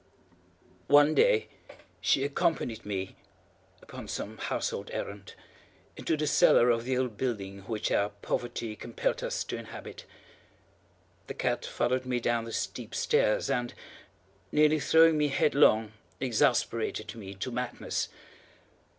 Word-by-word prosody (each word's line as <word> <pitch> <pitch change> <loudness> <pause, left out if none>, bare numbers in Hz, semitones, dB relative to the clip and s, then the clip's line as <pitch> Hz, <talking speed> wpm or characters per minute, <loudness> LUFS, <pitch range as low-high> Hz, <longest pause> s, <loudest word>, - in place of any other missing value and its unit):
One 145 +1 +6
day 485 - +4 0.5
she 135 - +2
accompanied 140 -6 -1
me, 95 -2 -4 0.7
upon - - -9
some - - -5
household - - -3
errand, 100 -1 -6 0.6
into 160 - -1
the 150 - -1
cellar 125 -4 +5
of 115 0 0
the 130 0 0
old 125 -5 -2
building 100 -6 -3
which 110 -2 -2
our 100 0 +2
poverty 110 +2 -4
compelled 115 +2 -2
us - - -2
to - - -5
inhabit. - - -9 1.2
The - - -6
cat - - -1
followed 130 +1 -1
me 125 -1 0
down 120 -1 0
the 115 - -7
steep - - -4
stairs, 105 - +2
and, 120 -1 -1 0.8
nearly 150 +1 +4
throwing 160 +1 +5
me 150 - +3
headlong, 125 -6 +3 0.3
exasperated 115 -3 0
me 100 -4 -9
to 110 +7 -4
madness. 125 0 -3
120 Hz, 125 wpm, -29 LUFS, 110-140 Hz, 1.2 s, One